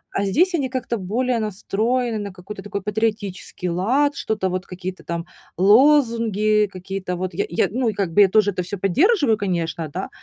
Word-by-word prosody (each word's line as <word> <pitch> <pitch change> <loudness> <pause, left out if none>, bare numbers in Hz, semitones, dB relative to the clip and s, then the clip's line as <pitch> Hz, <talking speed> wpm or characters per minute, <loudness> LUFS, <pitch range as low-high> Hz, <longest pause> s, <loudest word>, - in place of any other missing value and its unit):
А 200 - +1
здесь 345 - +2
они 280 -6 0
как-то 245 -2 -3
более 235 +6 -1
настроены 220 +3 -1
на 205 -1 -5
какой-то 190 +2 -9
такой 200 -1 -5
патриотический 205 -4 -3
лад, 255 +12 +1
что-то 210 -7 -1
вот, 185 +1 -4
какие-то 185 0 -7
там 170 0 -4 0.3
лозунги, 215 - +4
какие-то 185 0 -5
вот 185 0 -4
я 175 - -1
я, 170 - +1
ну 245 +1 0
и - - -2
как 195 -4 -2
бы 205 - +6
я 195 - +6
тоже 205 0 +3
это 180 - -3
всё 185 +3 -5
поддерживаю, 270 - +3
конечно, 170 -4 -2
да, 185 +6 -5
205 Hz, 180 wpm, -22 LUFS, 185-235 Hz, 0.3 s, бы